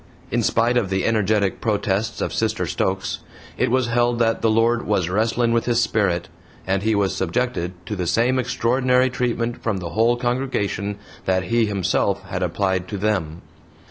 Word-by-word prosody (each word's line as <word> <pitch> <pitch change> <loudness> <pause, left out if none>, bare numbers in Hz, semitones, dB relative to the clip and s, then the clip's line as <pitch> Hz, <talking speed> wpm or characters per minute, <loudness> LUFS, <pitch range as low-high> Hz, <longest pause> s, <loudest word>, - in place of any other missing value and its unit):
In - - +1
spite 120 +2 +2
of 110 -6 +1
the 95 -1 0
energetic 105 -3 +1
protests 105 -1 -1
of - - -2
Sister - - 0
Stokes, - - -2 0.4
it - - +1
was 130 +1 +2
held 120 0 +1
that 115 -1 +1
the 115 - +3
Lord 115 +2 +2
"was 95 -5 +1
wrestlin' 115 +4 +1
with 115 - +1
his 120 -1 +2
sperrit," 100 -6 +1 0.4
and 95 +1 0
he 110 +1 +1
was 100 -2 +1
subjected 95 -2 -1
to 105 - -4
the 90 -3 -2
same 120 +7 +2
extraordinary 125 +1 +2
treatment 120 -2 -2
from 110 -4 -1
the 90 -2 -5
whole 115 +5 +2
congregation 120 -5 -1 0.3
that 95 0 +1
he 115 +1 +1
himself 100 -3 0
had - - -5
applied 95 -2 0
to 100 - -4
THEM. 95 -5 -1
110 Hz, 175 wpm, -22 LUFS, 95-120 Hz, 0.4 s, the